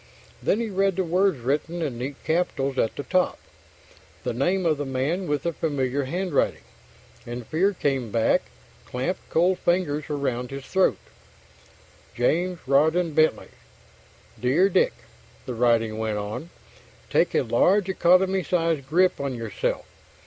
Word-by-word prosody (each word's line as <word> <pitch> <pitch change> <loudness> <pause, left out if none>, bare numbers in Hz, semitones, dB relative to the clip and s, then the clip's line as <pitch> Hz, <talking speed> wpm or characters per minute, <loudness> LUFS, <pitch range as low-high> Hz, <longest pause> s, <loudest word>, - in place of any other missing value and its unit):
Then 210 - +1
he 230 -2 -2
read 195 -1 +1
the 190 - 0
words 185 0 +2
written 150 +7 -1
in 130 -6 -3
neat 135 +3 -4
capitals 140 -5 0
at 115 - 0
the 145 - -4
top, 185 +3 +1 0.9
the - - -2
name 175 +10 0
of 155 -3 +2
the - - -1
man 145 +8 -1
with 145 -2 -1
the 170 - -1
familiar 140 -3 -1
handwriting, 175 +2 -1 0.6
and 120 0 -6
fear 185 - +2
came 135 -7 -1
back, 115 +1 +2 0.4
clamped 130 +9 -3
cold 180 +3 +2
fingers 175 -4 0
around 130 -4 -2
his 135 0 -7
throat: 190 -1 +2 1.2
James 175 +9 +1
Rawdon 160 +5 +3
Bentley 155 +1 +2 0.9
Dear 140 - +3
Dick, 480 - +2 0.5
the 125 - -4
writing 115 -2 +2
went 110 -1 -1
on, 105 +11 -5 0.6
Take - - +2
a - - +3
large 195 +1 +3
economy 190 +1 +3
size 165 -5 0
grip 175 +7 +2
on 140 -2 -2
yourself. 115 -3 -3
155 Hz, 140 wpm, -25 LUFS, 130-180 Hz, 1.2 s, Rawdon